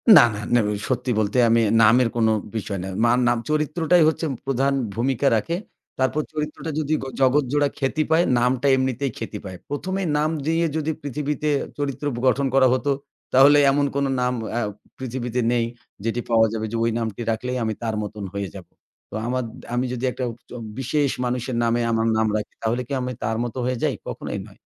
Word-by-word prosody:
না, - - +11
না, - - -5
না 120 - +6
উ - - 0 0.2
সত্যি 125 0 0
বলতে 110 +4 0
আমি 115 0 +4 0.2
নামের 115 +3 +6
কোনো 110 -1 +3 0.2
বিষয় 100 -2 -3
নাই। 95 - -5
মা 120 - +5 0.2
নাম 120 0 +3
চরিত্রটাই 155 +3 +3
হচ্ছে 160 +1 0 0.2
প্রধান 135 +1 +1 0.2
ভূমিকা 130 +3 +1
রাখে। 165 +11 -1 0.4
তারপর 130 +4 +1
চরিত্রটা 150 +1 -4
যদি 155 0 -1 0.3
জগৎজোড়া 145 +2 +3
খ্যাতি 145 +3 0
পায় 165 +2 +5
নামটা 125 +2 +2
এমনিতেই 130 0 -1
খ্যাতি 110 -2 -5
পায়। 95 -1 -7
১ম 180 +6 -3
এই 180 - -1
নাম 155 +1 +2 0.2
দিয়ে 165 +1 +2
যদি 160 +1 -1
পৃথিবীতে 150 +2 -2 0.3
চরিত্র 145 0 -3
ব - - -6
গঠন 135 +2 +2
করা 130 -1 +6
হত, 130 - -1 0.5
তাহলে 140 +3 +7
এমন 145 +1 +2
কোনো 140 -1 +1
নাম 125 0 +1 0.2
আ - - +2 0.4
পৃথিবীতে 125 -1 -3
নেই। 120 -1 +2 0.4
যেটি 115 +1 -1
পাওয়া 110 -1 +5
যাবে 110 0 -2
যে - - -3
ওই 115 - +2
নামটি 110 0 -3
রাখলেই 125 +3 -2
আমি 110 -1 0
তার 110 -1 -1
মতন 105 0 -6
হয়ে 100 -2 -3
যাবো। - - -11 0.4
তো - - -16
আমার 130 0 0
দ - - -12 0.2
আমি 125 +1 +1
যদি 125 +1 -2
একটা 130 - -5 0.3
চ - - -20 0.3
বিশেষ 140 +2 +1 0.2
মানুষের 125 0 -2
নামে 115 +1 +2
আমার 115 0 +1
নাম 110 0 +2
রাখি, 105 -1 -3
তাহলে 120 +3 0
কি 140 - -4
আমি 125 0 -3
তার 110 0 -1
মত 120 - -5
হয়ে 125 -1 0
যাই? - - +1
কখনোই - - -4
নয়। - - -17
125 Hz, 195 wpm, -23 LUFS, 115-145 Hz, 0.5 s, না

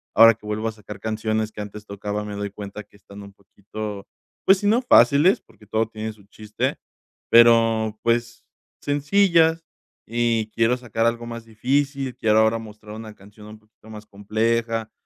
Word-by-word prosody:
ahora 115 +1 +8
que 110 - -19
vuelvo 110 +1 -2
a - - -2
sacar 105 -2 -11
canciones 110 0 -2
que 105 - -8
antes 105 0 -9
tocaba, 105 +1 -5
me 105 -1 -6
doy 100 0 -4
cuenta 105 +1 -8
que 100 - -23
están 100 0 -13
un 100 - -12
poquito, 100 +1 -8 0.4
pues, 195 - +6
si 205 - -1
no 230 +4 +3
fáciles 145 - +5
porque 105 -2 -22
todo 110 0 0
tiene 110 0 -6
su 105 -2 -21
chiste, 105 +1 -4 0.5
pero 115 -2 +5
pues, 120 0 -1 0.4
sencillas 165 +2 +2 0.4
y 115 -1 0
quiero 115 +2 +2
sacar 115 -2 -2
algo 115 0 0
más 115 -1 -8
difícil, 135 +4 -1
quiero 110 0 +3
ahora 110 +1 +3
mostrar 105 -1 -11
una 110 -1 -9
canción 105 +2 -16
un 110 0 -12
poquito 110 0 -22
más 105 -1 -10
compleja, 110 +2 -2
110 Hz, 170 wpm, -22 LUFS, 105-115 Hz, 0.5 s, ahora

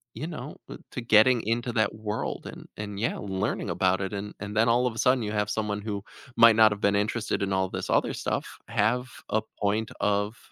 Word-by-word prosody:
you 140 +8 -4
know 150 -4 -7
uh, - - -7
to 125 - -4
getting 115 +2 +5
into 120 +2 0
that 110 -2 +1
world 110 0 -4
and - - -10
and, 105 -1 -5
yeah, 115 - -1
learning 95 0 -2
about 95 0 +2
it, 95 +1 -3
and 100 +1 -5
and 105 +1 -6
then 115 +2 +4
all 120 +2 +3
of 115 - -2
a - - -6
sudden 125 -2 +3
you 105 - -3
have 105 -1 0
someone 105 -1 -2
who 100 -2 -4 0.3
might 115 -1 +8
not 110 -1 +7
have 105 +1 -4
been 100 0 +3
interested 105 +2 -1
in 100 - -1
all 95 0 +1
this - - -5
other - - +2
stuff - - -3
have 115 +3 +1 0.2
a 110 - +1 0.2
point 105 +2 0
of 105 +2 0
105 Hz, 225 wpm, -27 LUFS, 100-115 Hz, 0.3 s, might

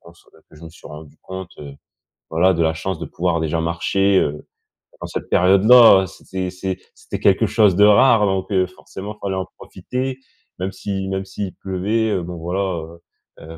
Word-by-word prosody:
qu'on 85 - -16
se 85 - -25
que 80 -1 -22
je 85 - -13
me - - -9
suis 85 - -15
rendu 75 0 -12
compte, 95 -1 -8
heu, 70 -2 -9 0.6
voilà, 90 +4 +3
de 85 - 0
la 80 0 +1
chance 95 +4 -4
de - - -5
pouvoir 85 -1 -1
déjà 80 +1 -1
marcher, 95 +4 +1
heu, 75 +1 -3 0.5
en - - -6
cette - - -6
période-là, 100 +2 +6
c'était 95 +1 -6
c'est 95 0 -5 0.2
c'était - - -7
quelque - - +3
chose 105 -5 +3
de 105 +2 +6
rare 110 +1 +5
donc 95 0 -2
heu, 95 -1 +2
forcément 95 +2 -9
il - - -34
fallait 95 -1 -2
en 95 - -3
profiter 130 +1 -5 0.4
même 95 +1 -3
si 95 0 -4
même 95 0 -3
s'il 95 0 -6
pleuvait. 100 +2 -1
Bon 85 +1 -7
voilà, 90 +4 -3
heu 85 -3 -4 0.4
heu, 80 +1 -11
95 Hz, 195 wpm, -20 LUFS, 85-100 Hz, 0.6 s, période-là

